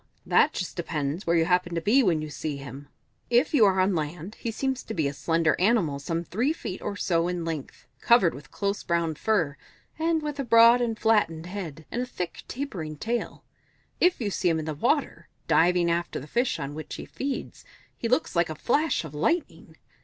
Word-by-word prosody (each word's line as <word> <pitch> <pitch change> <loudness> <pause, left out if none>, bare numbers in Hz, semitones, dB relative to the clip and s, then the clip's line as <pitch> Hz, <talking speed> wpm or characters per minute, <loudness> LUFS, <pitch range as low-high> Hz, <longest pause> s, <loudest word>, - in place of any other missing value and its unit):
That 305 - +4
just 185 - -4
depends 160 0 -3
where 170 - +3
you 165 -1 +3
happen 180 0 +1
to - - +1
be 230 +10 +4
when 170 -9 +2
you 155 - -6
see 150 0 -4
him. 140 +1 -9 0.4
If 245 +6 +3
you 245 -8 +6
are 190 -1 +3
on 190 +1 +3
land, 165 +4 -4
he 230 - -5
seems 260 +3 -2
to 220 - -7
be 155 -5 +1
a 140 - -3
slender 165 +1 +1
animal 180 -8 +2
some 165 +4 -2
three 230 - 0
feet 190 - -6
or 200 - -3
so 170 -4 +1
in 175 -2 -3
length, 160 -5 -6
covered 235 -8 +4
with 135 0 -11
close 200 0 -2
brown 170 -2 0
fur, 160 -4 0 0.4
and 325 -1 +1
with 295 -1 -4
a - - 0
broad 230 0 +6
and 230 -2 -1
flattened 185 -8 +2
head, 170 -5 -7
and 245 - -1
a 250 - -3
thick, 180 -7 -5
tapering 185 - -5
tail; 235 +8 -3 0.6
if 360 0 +3
you 210 -4 -2
see 180 - +1
him 165 - +1
in 155 - -3
the 155 - -3
water, 250 - 0 0.2
diving 175 0 +3
after 170 +1 -2
the 130 - -9
fish 240 - 0
on 140 +1 -4
which 155 +1 -7
he - - -7
feeds, 275 0 -5 0.3
he 230 - -3
looks 250 - +1
like 170 -1 +2
a 155 - -4
flash 290 - +1
of 155 - -9
lightning! 325 - -2
180 Hz, 210 wpm, -26 LUFS, 160-235 Hz, 0.6 s, you